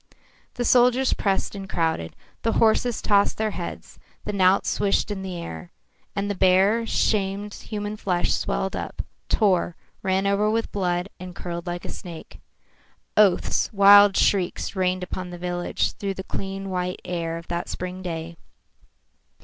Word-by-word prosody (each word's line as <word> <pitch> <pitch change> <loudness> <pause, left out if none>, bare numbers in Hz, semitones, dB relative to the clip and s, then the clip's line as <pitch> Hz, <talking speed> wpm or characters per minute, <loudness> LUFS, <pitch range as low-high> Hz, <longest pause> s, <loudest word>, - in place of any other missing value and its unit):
The 245 - -2
soldiers 250 +2 +4
pressed 195 -2 0
and 195 -1 -7
crowded, 160 - -1 0.3
the 225 - 0
horses 230 +1 +2
tossed 200 -1 +3
their 220 0 0
heads, 175 -3 -7 0.3
the 210 - -3
knout 190 -1 +4
swished 200 +1 +1
in 195 -2 -4
the 185 -2 -5
air, 170 +1 -7 0.4
and 200 0 -1
the 205 - -1
bare, 195 +5 +3
shamed 205 -1 0
human 210 -1 -5
flesh 180 -4 0
swelled 190 - -1
up, - - -5 0.3
tore, 185 -5 +2 0.3
ran 190 +1 +1
over 200 +2 +2
with 225 +1 -1
blood, 180 -2 -1
and 180 -1 -8
curled 170 0 -6
like 175 0 -4
a - - -6
snake. 170 -3 -9 0.8
Oaths, 205 -4 +3
wild 200 0 +7
shrieks 195 0 +1
rained 185 -1 0
upon 180 0 -5
the 175 - -7
village 175 0 -1
through 195 -1 -4
the 190 - -6
clean 195 0 -5
white 180 0 -2
air 170 -2 -3
of 170 - -10
that 170 0 -3
spring 185 +1 -5
day. 165 -2 -5
190 Hz, 155 wpm, -24 LUFS, 180-205 Hz, 0.8 s, wild